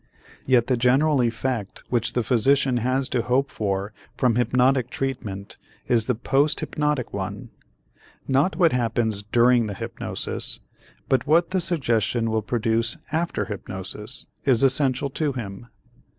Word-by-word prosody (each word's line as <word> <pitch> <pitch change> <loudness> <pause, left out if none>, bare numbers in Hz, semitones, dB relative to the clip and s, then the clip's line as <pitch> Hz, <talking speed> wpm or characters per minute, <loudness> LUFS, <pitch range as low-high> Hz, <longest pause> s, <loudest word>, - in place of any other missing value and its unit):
Yet 125 -3 +4
the 125 -1 +1
general 135 +4 +3
effect 115 -2 -2
which 120 -2 0
the 120 - 0
physician 130 +3 +2
has 130 +3 0
to 125 - 0
hope 130 +4 0
for 100 0 -2 0.2
from 125 -2 +3
hypnotic 125 +1 +2
treatment 110 -8 -4 0.3
is 115 -3 +2
the 125 - +1
post 135 +6 +1
hypnotic 150 -5 -2
one. 100 +4 -5 0.8
Not 140 +8 +2
what 170 -4 +4
happens 115 -3 0
during 120 +2 +3
the 100 - -5
hypnosis - - -3 0.5
but 130 +1 +1
what 165 +4 +3
the 185 -1 +1
suggestion 120 - 0
will 110 0 +1
produce 115 +1 0
after 165 +2 -1
hypnosis 105 +3 -5 0.2
is 130 -3 +3
essential 135 0 +2
to 150 0 -1
him. 110 -2 -7
125 Hz, 135 wpm, -24 LUFS, 110-135 Hz, 0.8 s, Yet